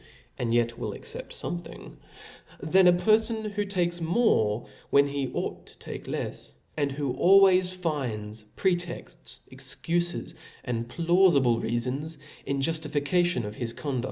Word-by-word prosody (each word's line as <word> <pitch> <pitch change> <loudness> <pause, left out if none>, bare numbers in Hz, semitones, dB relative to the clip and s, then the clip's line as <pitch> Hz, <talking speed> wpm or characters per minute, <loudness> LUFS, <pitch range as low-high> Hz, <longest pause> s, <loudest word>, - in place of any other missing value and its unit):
^"» - - -1
^^^ 115 - 0
y^^ 115 0 -11 0.2
^^^^ - - -8
accept - - -8
of 85 0 -3
fpmething, - - -11 0.6
than' 185 +4 +4
a 180 - +7
perfon 220 +3 +2
who 205 +1 -1
takes 175 -3 -1
more 160 - +2 0.2
when 140 0 +5
he 140 -2 -2
ought - - -4
to - - -12
tak« - - -8
lefs, - - -5 0.2
and 145 -2 0
who 140 -2 -2
always 185 -1 +6
finds, 115 -12 -3
pretexts, 175 -2 -2
excufes^ 140 +7 -2 0.3
and 115 -2 -3
piaufible 165 -6 +3
reafons^ 125 +7 -1 0.3
in 140 0 0
juftification 155 -1 +1
of 105 - -5
his 115 -2 -3
con 140 -2 -3
150 Hz, 140 wpm, -27 LUFS, 125-180 Hz, 0.6 s, a